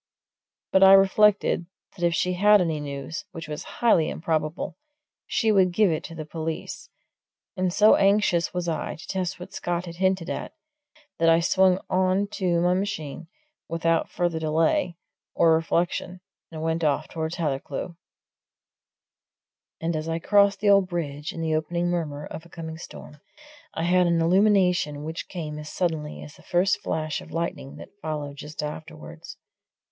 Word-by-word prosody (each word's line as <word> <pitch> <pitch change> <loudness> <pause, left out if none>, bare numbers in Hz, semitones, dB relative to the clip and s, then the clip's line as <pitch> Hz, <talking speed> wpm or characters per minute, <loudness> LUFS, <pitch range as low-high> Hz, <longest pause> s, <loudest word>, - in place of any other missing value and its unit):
But 190 - +4
I 195 0 +9
reflected 195 -2 +4 0.3
that 175 - -7
if 170 -1 +2
she 180 +2 0
had 205 +3 +5
any 165 -4 0
news 145 +2 -6
which 165 -3 -7
was 150 0 -5 0.2
highly 170 -9 +4
improbable 155 0 -2 0.5
she 225 -2 +1
would 190 -3 +4
give 200 0 +3
it 155 - -2
to 165 - -9
the 155 -1 -6
police; 160 +1 -5 0.7
and 185 -2 0
so 210 +4 +6
anxious 195 -4 +2
was 180 -1 -3
I 165 - -2
to 160 - -12
test 180 -5 -3
what 185 +2 -10
Scott 175 -1 -2
had 170 -1 -9
hinted 185 -2 +1
at, - - -5 0.7
that 165 0 +4
I 165 0 +5
swung 185 +2 +3
on 185 +2 +2
to 175 -4 0
my 180 +1 +3
machine 170 -5 -3 0.4
without 165 0 0
further 175 -2 -1
delay 165 - +1 0.4
or 165 -1 +5
reflection 170 +2 -1 0.3
and 160 -1 -6
went 165 +1 -1
off 150 0 +1
towards 160 0 -4
Hathercleugh. 155 +2 -3 1.8
And 165 0 -2
as 155 +1 -3
I 165 - -1
crossed 200 +3 +3
the 205 - +3
old 195 -2 +5
bridge, 150 -3 -4
in 165 - -6
the 160 -1 0
opening 170 +3 -1
murmur 150 -4 -3
of 160 - -8
a 170 - -17
coming 160 -1 -7
storm, 150 -3 -11 0.5
I 165 - -2
had 180 +1 +3
an 170 -1 +2
illumination 180 -4 +3
which 160 +2 -6
came 155 -4 -5
as 150 0 -8
suddenly 160 -4 -3
as 150 - -12
the - - -17
first 180 +2 +1
flash 155 -1 -2
of - - -13
lightning 165 -4 -4
that - - -12
followed 150 -2 -4
just 150 +1 -6
afterwards. 155 +2 -8
170 Hz, 165 wpm, -25 LUFS, 155-185 Hz, 1.8 s, I